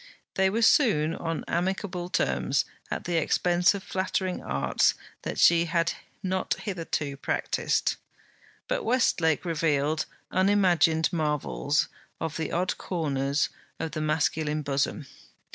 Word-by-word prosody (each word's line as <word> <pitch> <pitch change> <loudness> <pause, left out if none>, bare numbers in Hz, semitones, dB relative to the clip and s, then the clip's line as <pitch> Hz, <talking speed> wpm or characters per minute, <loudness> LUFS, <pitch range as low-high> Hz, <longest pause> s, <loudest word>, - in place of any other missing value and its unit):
They 190 0 +3
were 225 +4 0
soon 180 - +4
on 165 -1 -3
amicable 180 0 -2
terms, - - +1 0.2
at - - -3
the 175 -1 -1
expense 175 +4 +3
of 195 - -6
flattering 185 -1 -2
arts 70 -1 +1 0.3
that - - -4
she 170 0 +5
had 170 0 +1 0.3
not 190 0 0
hitherto 165 -7 -3
practised. - - 0 0.7
But - - -1
Westlake 170 - +2
revealed 155 -2 0 0.2
unimagined 180 -5 +3
marvels 150 -1 0 0.3
of 160 -1 -3
the 160 -2 -3
odd 180 +3 -1
corners 145 -5 0 0.3
of 160 - -3
the 155 - -3
masculine 155 0 0
bosom. 140 +2 -1
165 Hz, 120 wpm, -27 LUFS, 150-185 Hz, 0.7 s, she